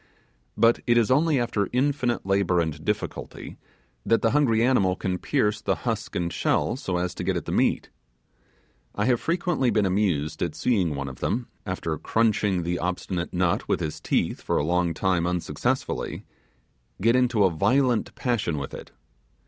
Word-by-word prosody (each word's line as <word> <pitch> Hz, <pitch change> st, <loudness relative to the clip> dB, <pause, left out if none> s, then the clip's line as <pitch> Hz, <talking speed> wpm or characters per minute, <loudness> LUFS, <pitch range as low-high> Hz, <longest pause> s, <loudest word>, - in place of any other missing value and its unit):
But 115 Hz, +1 st, +4 dB
it 120 Hz, 0 st, +4 dB
is 115 Hz, 0 st, +3 dB
only 150 Hz, +1 st, +3 dB
after 110 Hz, -4 st, -1 dB
infinite 130 Hz, -3 st, 0 dB
labour 95 Hz, -2 st, +2 dB
and 80 Hz, -2 st, -2 dB
difficulty, 105 Hz, +4 st, -4 dB, 0.4 s
that 115 Hz, -, +2 dB
the 115 Hz, -, +3 dB
hungry 120 Hz, -7 st, +3 dB
animal 100 Hz, -8 st, +3 dB
can 90 Hz, -1 st, -2 dB
pierce 105 Hz, -7 st, 0 dB
the -, -, 0 dB
husk 110 Hz, -3 st, -2 dB
and 85 Hz, -1 st, -1 dB
shell -, -, +1 dB
so 95 Hz, -9 st, -3 dB
as 90 Hz, +1 st, -2 dB
to -, -, -6 dB
get -, -, 0 dB
at -, -, -5 dB
the -, -, -4 dB
meat. -, -, +1 dB, 1.0 s
I 105 Hz, -, 0 dB
have 120 Hz, -1 st, +2 dB
frequently 170 Hz, -6 st, 0 dB
been 105 Hz, -3 st, +2 dB
amused 90 Hz, -6 st, 0 dB
at -, -, -1 dB
seeing 95 Hz, -11 st, +1 dB
one 70 Hz, 0 st, -4 dB
of 65 Hz, -2 st, -8 dB
them, 120 Hz, +1 st, -2 dB, 0.2 s
after 90 Hz, -3 st, -2 dB
crunching 105 Hz, -5 st, +1 dB
the 90 Hz, +1 st, -2 dB
obstinate 90 Hz, 0 st, -3 dB
nut 90 Hz, -1 st, 0 dB
with -, -, +1 dB
his 75 Hz, -, -4 dB
teeth -, -, 0 dB
for -, -, -1 dB
a 75 Hz, -, +1 dB
long 85 Hz, 0 st, +1 dB
time 90 Hz, -2 st, +1 dB
unsuccessfully, 90 Hz, -1 st, -2 dB, 0.7 s
get 115 Hz, +5 st, +3 dB
into 125 Hz, -4 st, +3 dB
a 95 Hz, -, +4 dB
violent 120 Hz, -, +1 dB
passion 115 Hz, -, -1 dB
with 70 Hz, -1 st, -5 dB
it. -, -, -8 dB
100 Hz, 175 wpm, -25 LUFS, 90-120 Hz, 1.0 s, But